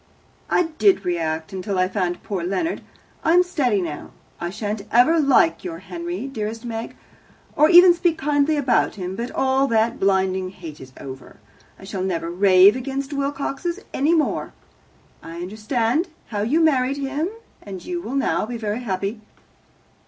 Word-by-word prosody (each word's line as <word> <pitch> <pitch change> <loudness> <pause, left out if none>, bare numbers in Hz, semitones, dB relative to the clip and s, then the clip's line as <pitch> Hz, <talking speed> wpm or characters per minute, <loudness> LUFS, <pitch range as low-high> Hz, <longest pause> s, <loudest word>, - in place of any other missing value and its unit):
"I - - +3 0.2
did 395 -2 +4
react 165 0 -2
until 190 +1 -3
I 185 0 +3
found 185 -2 -2
poor 195 -5 -3
Leonard. 195 - -2 0.4
I 325 - +3
am 360 +1 +6
steady 255 - 0
now. 155 -4 -6 0.3
I 175 - -3
shan't 210 +2 -4
ever 300 +8 +5
like 295 +3 +3
your 340 -3 -5
Henry, 345 -3 -6
dearest 225 -3 -5
Meg, 225 -1 -5 0.6
or 305 +1 +5
even 355 +1 +9
speak 345 -1 0
kindly 295 +1 +1
about 270 -3 +1
him, 185 -2 -5
but 235 +4 -4
all 265 +1 +1
that 225 -1 +1
blinding 190 -1 +1
hate 165 -5 -10
is 130 0 -11
over. 130 -1 -10 0.4
I - - -16
shall 190 0 -5
never 170 -3 -2
rave 190 +2 +6
against 270 +2 -4
Wilcoxes 280 +5 -3
any 305 +5 +2
more. 310 - -1 0.7
I 165 +1 -9
understand 225 - -1 0.2
how 210 -3 -2
you 275 +10 +2
married 275 -4 +2
him, 285 +5 -2 0.3
and 190 -3 -9
you 350 -1 -3
will 265 -4 -5
now 270 -5 0
be 240 0 -4
very 215 0 -3
happy." 205 -1 -3
230 Hz, 160 wpm, -22 LUFS, 190-290 Hz, 0.7 s, even